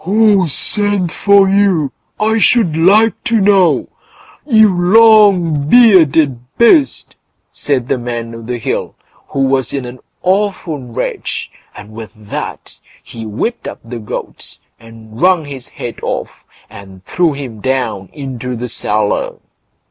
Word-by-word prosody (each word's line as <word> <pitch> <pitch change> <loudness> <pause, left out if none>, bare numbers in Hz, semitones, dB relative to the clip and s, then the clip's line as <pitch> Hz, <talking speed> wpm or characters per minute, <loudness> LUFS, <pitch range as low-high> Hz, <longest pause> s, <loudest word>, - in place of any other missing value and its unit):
"Who 205 -1 +2
sent 200 +3 +3
for 200 +1 +3
you, 190 -7 +1 0.3
I 220 +1 +1
should 210 -8 +2
like 205 +7 +3
to 230 -3 +1
know? 195 -3 +2 0.6
you 220 -5 +5
long 185 -5 +3
bearded 160 - +4 0.2
beast!" 270 +5 +2 0.4
said 130 -4 -2
the 130 - -1
Man 120 -1 -5
o' 115 - -9
the 120 +2 -5
Hill, 115 - -4 0.3
who 135 - -3
was 135 -2 0
in 135 -3 -4
an 125 +1 -10 0.2
awful 185 -5 -1
rage, 120 -3 -5 0.2
and 105 +1 -12
with 110 0 -9
that 105 -1 -8 0.2
he 115 -1 -9
whipped 125 - -4
up - - -8
the 115 +1 -8
goat, 105 - -8 0.2
and 115 0 -14
wrung 180 -3 +3
his 135 -3 -9
head 120 - -8
off, - - -4 0.4
and 95 -3 -14
threw 170 - 0
him 130 -6 -8
down 115 -6 -3
into 130 -3 -6
the 120 +1 -6
cellar. 105 -2 -2
145 Hz, 135 wpm, -14 LUFS, 120-200 Hz, 0.6 s, you